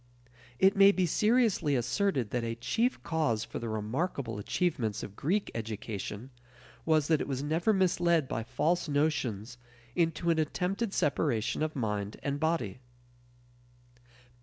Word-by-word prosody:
It 190 +6 +4
may 200 0 +8
be 185 -2 +1
seriously 210 - +2
asserted 130 - 0
that 120 -1 -1
a 115 0 -2
chief 230 - -1
cause 150 -10 0
for - - -6
the 115 - -4
remarkable 115 - -2
achievements 115 - -1
of 100 - -8
Greek 195 - -1
education 110 +1 -5 0.6
was 155 -2 +3
that 160 -2 +3
it - - -3
was 135 -1 -2
never 160 +8 +1
misled 175 -6 +2
by 115 - -2
false 165 +8 0
notions 125 -6 -1 0.4
into 165 0 +1
an 160 - +1
attempted 190 +7 -1
separation 120 - 0
of 155 0 -1
mind 105 -4 -2
and 140 0 -2
body. 160 - -1
150 Hz, 135 wpm, -30 LUFS, 115-175 Hz, 0.6 s, may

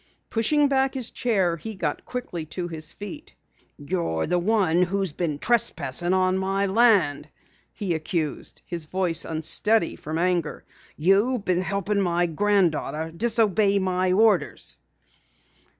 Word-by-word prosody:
Pushing 290 +6 +2
back 270 0 +1
his 255 -3 -3
chair 190 -8 0
he 215 +7 -7
got 165 -6 -3
quickly 245 -10 -5
to 175 +3 -5
his 160 -2 -5
feet. 295 +10 -9 0.4
"You're 145 - -2
the 180 +1 0
one 180 -3 +2
who 185 +2 0
has 190 -4 0
been 155 -2 -3
trespassing 185 -3 +1
on 185 0 +2
my 195 +1 0
land!" 190 -9 +3 0.4
he 195 -6 -3
accused, 160 -1 -4
his 170 -3 -4
voice 180 0 0
unsteady 165 +5 +1
from 155 +2 -5
anger. 175 -2 -1 0.3
"You've 200 +8 +2
been 180 -1 +1
helping 200 +2 -1
my 175 -1 +1
granddaughter 165 -3 0
disobey 215 -2 +2
my 185 -1 0
orders!" 195 -7 +2
185 Hz, 135 wpm, -24 LUFS, 165-210 Hz, 0.4 s, land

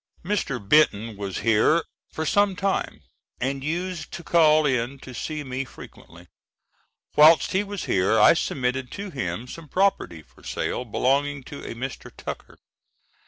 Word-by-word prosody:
Mr. 180 -9 -1
Benton 110 -1 +2
was 100 -2 -5
here 115 +9 +4 0.3
for 160 - -3
some 200 +5 +2
time 195 +1 -2 0.4
and 135 +1 -2
used 170 +2 -3
to 170 - -7
call 155 -2 +4
in 130 -1 0
to 130 -1 -11
see 150 +5 -4
me 130 0 -3
frequently. 130 - -14 0.9
Whilst 155 0 +6
he 190 +2 +1
was 205 -2 -6
here 95 +4 +2
I - - +8
submitted 130 -5 -2
to 200 -1 -6
him 110 - -4
some 160 +4 -10
property 185 - 0
for - - -23
sale, 125 - -3
belonging 140 +4 0
to 140 +2 -9
a - - -6
Mr. 130 +2 -6
Tucker. - - -8
140 Hz, 150 wpm, -24 LUFS, 125-165 Hz, 0.9 s, I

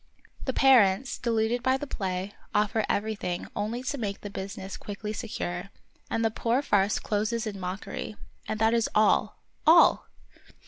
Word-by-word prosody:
The 260 - +1
parents, 245 -3 +4
deluded 230 0 +1
by 260 +1 +2
the 290 - -5
play, 190 -5 -3 0.2
offer 210 +1 +2
everything 200 -4 -2
only 225 +4 -2
to 280 +2 -3
make 200 -3 -3
the 205 - -7
business 195 0 -6
quickly 210 +1 -6
secure; 195 -5 -4 0.4
and 225 - 0
the 225 - +2
poor 240 +5 0
farce 205 -4 +2
closes 215 +2 -1
in 205 -2 -5
mockery. 190 +3 -5 0.3
And 215 - -2
that 225 +1 +3
is 230 -1 +2
all, 215 0 +2 0.2
all 335 +2 +6
215 Hz, 150 wpm, -28 LUFS, 200-235 Hz, 0.4 s, all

